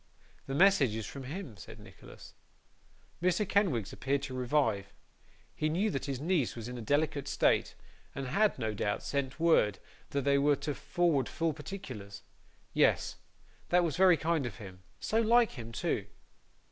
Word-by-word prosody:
'The 135 - -3
message 165 - +5
is 110 -1 -4
from 135 -2 -8
him,' 155 - -6
said - - -11
Nicholas. - - -14 0.9
Mr. 180 +3 +1
Kenwigs 160 - +1
appeared 140 +1 -1
to 135 -2 -5
revive. 120 -6 0 0.6
He 155 - -1
knew 195 +7 +1
that 135 - -3
his 135 -3 -3
niece 160 -4 0
was 115 -1 -6
in 125 - -6
a 120 - -6
delicate 145 +3 0
state, - - +2 0.4
and 135 - -4
had, 205 +11 +2
no 110 -4 -2
doubt, 105 0 -2
sent 140 0 -2
word 160 - +3 0.3
that 140 -1 -1
they 140 0 +3
were 145 +1 +4
to 145 +1 -3
forward 160 -5 0
full 165 -1 -1
particulars. 130 - -8 0.5
Yes. - - +2 0.5
That 180 0 +4
was 160 -5 -1
very 185 -2 +6
kind 160 -3 0
of - - -7
him; 95 -4 -11 0.2
so 225 +1 +1
like 230 +1 +4
him 115 -3 -8
too! - - -2
140 Hz, 165 wpm, -31 LUFS, 120-170 Hz, 0.9 s, very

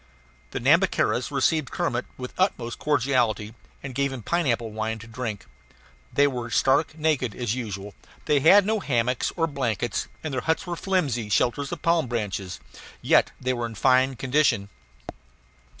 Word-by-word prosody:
The - - -4
Nhambiquaras - - +2
received 155 -5 +1
Kermit 120 +1 -2
with 125 -1 -7
the - - -3
utmost 120 -11 0
cordiality, 125 -7 +1 0.3
and 135 -2 -6
gave 140 +2 0
him 130 -4 -7
pineapple 120 -9 0
wine 110 +1 -3
to 110 - -11
drink. 115 -3 -5 0.7
They 145 - +4
were 125 -4 -2
stark 140 +6 +2
naked 150 -8 0
as 120 -3 -1
usual; 105 -5 -5 0.3
they 145 - +3
had 190 +8 +6
no 220 +1 +1
hammocks 125 -6 0
or 165 - +2
blankets, 120 -7 -2 0.2
and 155 -3 -4
their 130 - -1
huts 160 +7 0
were 175 -1 -3
flimsy 145 - -1
shelters 125 +6 +1
of 170 -3 -6
palm 165 -4 +2
branches. 100 -6 -3 0.4
Yet - - +4
they 130 0 0
were 120 -1 -2
in 115 - -10
fine 130 +3 +3
condition. 130 -6 +1
125 Hz, 160 wpm, -25 LUFS, 115-150 Hz, 0.7 s, had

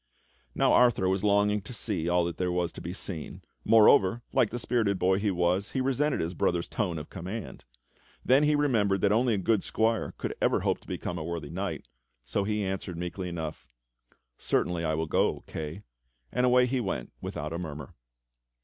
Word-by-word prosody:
Now - - +3
Arthur 120 -6 +4
was 95 +1 0
longing 105 0 +3
to 110 +5 -8
see 95 -7 -2
all 90 0 +3
that 85 -2 -4
there 90 -1 0
was 90 -1 0
to - - -10
be 85 - -5
seen; 90 -4 -6 0.2
moreover, 110 0 +5
like 130 -5 +3
the 120 - -4
spirited 115 -5 0
boy 95 +1 +2
he 105 0 0
w^as, 90 +2 0
he 135 - 0
resented 135 +2 +1
his 85 +2 -2
brother's 85 0 0
tone 90 -7 -2
of 75 - -8
command. 95 +6 -7 0.6
Then 130 +3 +5
he 150 0 +3
remembered 110 -10 +2
that 100 - +3
only 115 +1 +3
a - - -1
good 100 +2 +2
squire 115 0 0
could - - -3
ever - - +2
hope - - 0
to - - -22
become 85 - -4
a - - -4
worthy 80 -3 -5
knight, 95 +4 -4 0.4
so 100 +11 -1
he 105 0 -1
answered 95 -2 -4
meekly 90 +1 -4
enough: 80 -2 -6 0.7
"Certainly 90 -1 0
I 80 -1 0
will 80 +1 -1
go, 80 - +1
Kay," 80 +5 -6 0.5
and 125 0 +2
away 125 0 +5
he 130 +1 0
went 100 -6 -3
without 75 +2 -5
a 85 - -3
murmur. 75 -5 -7
95 Hz, 195 wpm, -28 LUFS, 85-115 Hz, 0.7 s, moreover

